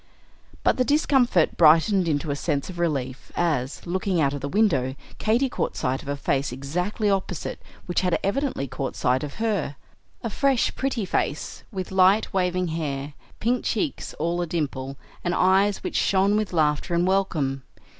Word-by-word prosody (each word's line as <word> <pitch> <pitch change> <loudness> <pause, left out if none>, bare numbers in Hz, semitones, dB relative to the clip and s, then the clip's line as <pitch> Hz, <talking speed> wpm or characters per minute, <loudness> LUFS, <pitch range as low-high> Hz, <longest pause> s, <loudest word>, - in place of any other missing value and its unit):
But - - +3
the 255 - +3
discomfort 265 - +3
brightened 170 +4 +5
into 150 -1 0
a - - -1
sense 145 +3 -2
of 175 - -9
relief 135 -6 -2
as, 150 -6 -1
looking 185 0 0
out 140 -2 +2
of 145 - -5
the 140 - -3
window, 140 -10 +2 0.2
Katy 235 +5 +2
caught - - -2
sight 130 +1 -1
of - - -13
a 145 0 -2
face 140 -1 0
exactly 180 - -2
opposite, 195 -4 -2 0.2
which 175 - 0
had 180 -2 +2
evidently 200 - -1
caught 135 +1 -4
sight 130 +1 +1
of 145 -1 -6
her, 210 -9 -1 0.5
a 230 - -1
fresh, 270 -1 +2
pretty 260 -6 -1
face, 150 -4 -2
with 190 -3 -5
light, 190 +3 +4
waving 180 -1 0
hair, 145 -3 -3 0.3
pink 245 +2 +1
cheeks 275 +6 -2
all 170 +1 -1
a 175 - -2
dimple, 140 -5 -3 0.3
and 175 0 0
eyes 195 +2 +3
which - - -2
shone 195 +1 +3
with 215 -1 0
laughter 155 +1 +1
and 170 +1 +2
welcome. 160 -8 0
175 Hz, 170 wpm, -25 LUFS, 145-200 Hz, 0.5 s, brightened